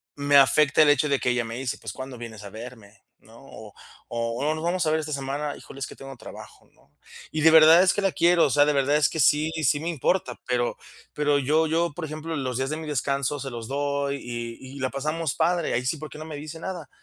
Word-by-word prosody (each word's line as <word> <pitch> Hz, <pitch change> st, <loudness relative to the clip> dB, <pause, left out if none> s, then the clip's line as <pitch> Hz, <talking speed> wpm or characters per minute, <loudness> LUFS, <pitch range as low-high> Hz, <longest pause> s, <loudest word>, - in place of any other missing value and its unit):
me 145 Hz, 0 st, +3 dB
afecta 145 Hz, +3 st, +5 dB
el 150 Hz, -, +4 dB
hecho 145 Hz, +1 st, +1 dB
de 140 Hz, -1 st, +2 dB
que 125 Hz, -, +1 dB
ella 125 Hz, -1 st, 0 dB
me 115 Hz, +1 st, -6 dB
dice: 135 Hz, +2 st, -3 dB
"pues 110 Hz, -3 st, -7 dB
¿cuándo 130 Hz, -1 st, -8 dB
vienes 110 Hz, -3 st, -9 dB
a 100 Hz, -, -8 dB
verme, 110 Hz, -2 st, -11 dB, 0.2 s
no?", -, -, -18 dB
o -, -, -12 dB, 0.4 s
o, 115 Hz, +6 st, -1 dB
"¿nos 155 Hz, -, -6 dB
vamos 175 Hz, 0 st, 0 dB
a 155 Hz, -, +1 dB
ver 160 Hz, -, +2 dB
esta 155 Hz, 0 st, -5 dB
semana?", 140 Hz, +2 st, -3 dB
"híjole, 135 Hz, -, -12 dB
es 135 Hz, -, -3 dB
que -, -, -11 dB
tengo 135 Hz, 0 st, -10 dB
trabajo", 110 Hz, -, -12 dB
¿no? -, -, -29 dB, 0.4 s
Y 155 Hz, 0 st, -2 dB
de 160 Hz, -, +7 dB
verdad 160 Hz, +2 st, +8 dB
es 185 Hz, -, +3 dB
que 205 Hz, -, 0 dB
la 195 Hz, -, +2 dB
quiero, 170 Hz, 0 st, +4 dB
o -, -, +1 dB
sea, 145 Hz, +2 st, +5 dB
de 150 Hz, -, +2 dB
verdad 140 Hz, +2 st, +2 dB
es 150 Hz, -, +3 dB
que 160 Hz, -, -5 dB
sí 150 Hz, +2 st, +3 dB
sí 145 Hz, +1 st, +3 dB
me 165 Hz, -, -3 dB
importa, 165 Hz, -4 st, -1 dB
pero 125 Hz, -1 st, -1 dB, 0.4 s
pero 145 Hz, -1 st, +1 dB
yo 150 Hz, +4 st, +2 dB
yo, 165 Hz, +1 st, +1 dB
por 160 Hz, 0 st, -5 dB
ejemplo, 155 Hz, +1 st, -5 dB
los 130 Hz, -4 st, -3 dB
días 135 Hz, +1 st, -1 dB
de 155 Hz, -, -3 dB
mi 160 Hz, -, -7 dB
descanso 140 Hz, 0 st, -1 dB
se 135 Hz, 0 st, -5 dB
los 115 Hz, -2 st, -7 dB
doy 140 Hz, 0 st, -1 dB
y 120 Hz, +2 st, -7 dB
y -, -, -8 dB
la 130 Hz, -, -1 dB
pasamos 155 Hz, +2 st, -2 dB
padre 170 Hz, 0 st, +1 dB
ahí 125 Hz, -, 0 dB
sí, 160 Hz, -, 0 dB
¿por 155 Hz, +1 st, -8 dB
qué -, -, -10 dB
no 155 Hz, -, -7 dB
me 155 Hz, -2 st, -7 dB
dice 155 Hz, +2 st, -8 dB
nada? 175 Hz, -3 st, -6 dB
145 Hz, 255 wpm, -25 LUFS, 130-155 Hz, 0.4 s, verdad